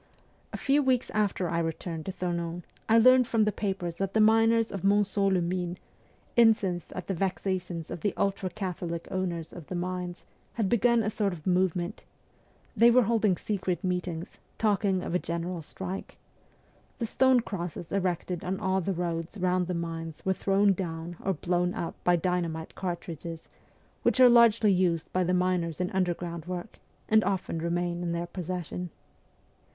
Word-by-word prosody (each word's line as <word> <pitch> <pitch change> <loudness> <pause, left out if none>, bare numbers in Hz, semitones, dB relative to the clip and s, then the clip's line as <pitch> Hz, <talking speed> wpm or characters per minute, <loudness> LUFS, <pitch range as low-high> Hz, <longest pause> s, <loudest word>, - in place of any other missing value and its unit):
A - - -4
few 285 +2 +2
weeks 260 -3 +1
after 205 -4 0
I 170 0 0
returned 165 0 -4
to - - -1
Thonon 170 -1 -3 0.3
I 225 - +6
learned 255 +1 +6
from 225 -3 +2
the 210 - +2
papers 190 -4 -3
that 195 +1 -2
the - - +4
miners 225 +1 +4
of 195 - -4
Monceau 200 0 +3
les 185 -2 +2
Mines, 175 0 -2 0.6
incensed 215 -7 +3
at 180 - -5
the 195 - -2
vexations 185 -2 -2
of 170 - -5
the 205 - -1
ultra 195 -1 0
Catholic 175 -3 -4
owners 175 -4 -3
of 170 -4 -10
the 185 - -5
mines, 180 0 -4 0.3
had 220 -5 0
begun 235 +1 +3
a 215 - -1
sort 205 -3 0
of 155 -3 -10
movement; 180 0 0 0.7
they 230 +2 +7
were 250 +1 +6
holding 215 -4 +2
secret 185 -4 -2
meetings, 180 -2 -3 0.2
talking 200 -3 +1
of - - -4
a 180 - +2
general 170 +1 -3
strike; 190 +4 -7 0.8
the 235 - -2
stone 260 +2 +4
crosses 175 -6 -5
erected 180 -2 -1
on 190 +1 -2
all 190 -1 +1
the 195 +2 -1
roads 170 +1 -3
round 180 -1 +1
the 180 - -2
mines 165 -2 -5
were 190 - +3
thrown 195 +1 +3
down 170 -2 -5
or 195 - +1
blown 175 +2 0
up 165 - -3
by 175 - +4
dynamite 170 -2 -2
cartridges, 170 -3 -6 0.5
which - - +2
are 255 -1 +9
largely 230 -3 +6
used 175 -3 0
by 185 - +2
the 180 - 0
miners 180 -3 0
in 180 0 -1
underground 175 -3 -2
work, 180 +3 -6 0.3
and 220 0 +4
often 185 -4 -1
remain 175 +1 -1
in 170 -1 -2
their 170 0 -2
possession. 180 0 -5
180 Hz, 170 wpm, -28 LUFS, 175-200 Hz, 0.8 s, are